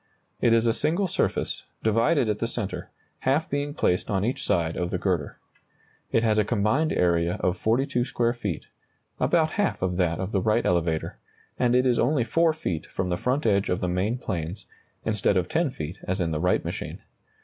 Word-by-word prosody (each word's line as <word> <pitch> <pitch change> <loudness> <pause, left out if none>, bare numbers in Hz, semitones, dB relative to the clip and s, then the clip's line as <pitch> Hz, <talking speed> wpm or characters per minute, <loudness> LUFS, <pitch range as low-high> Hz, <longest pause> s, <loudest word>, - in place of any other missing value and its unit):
It 120 - +4
is 115 0 +4
a 115 - +3
single 175 - +1
surface, - - -1 0.2
divided 115 +5 +3
at 105 -1 -1
the 115 - 0
centre, 110 -4 -4 0.3
half 145 +5 +1
being 145 +1 -2
placed 90 - +1
on 100 -1 +1
each 125 - -2
side 85 -4 +1
of 90 0 -2
the 90 - -1
girder. 90 -3 -1 0.7
It 115 - +2
has 110 -1 +3
a - - +4
combined 120 +9 +1
area 85 -1 +2
of 90 - +1
42 120 +5 +1
square 120 -2 0
feet, 105 - -4 0.5
about 160 -2 +2
half 205 - 0
of 90 -1 0
that 85 -3 +1
of 95 +2 -3
the 95 - +1
Wright 110 +4 +2
elevator, 85 -2 0 0.4
and 125 -1 +3
it 125 +1 +4
is 125 -2 +3
only 130 +1 +2
4 165 +9 +3
feet 90 - -4
from 90 - -3
the 90 - +1
front 130 +9 -1
edge 100 -3 +2
of 90 - 0
the 90 - -1
main 95 +7 0
planes, 90 -3 -4 0.4
instead 105 -3 +1
of 90 -1 +1
10 165 - +1
feet 80 - -6
as 95 +2 -1
in 85 -2 0
the 75 - -1
Wright 90 +3 +1
machine. - - -5
105 Hz, 200 wpm, -26 LUFS, 90-125 Hz, 0.7 s, It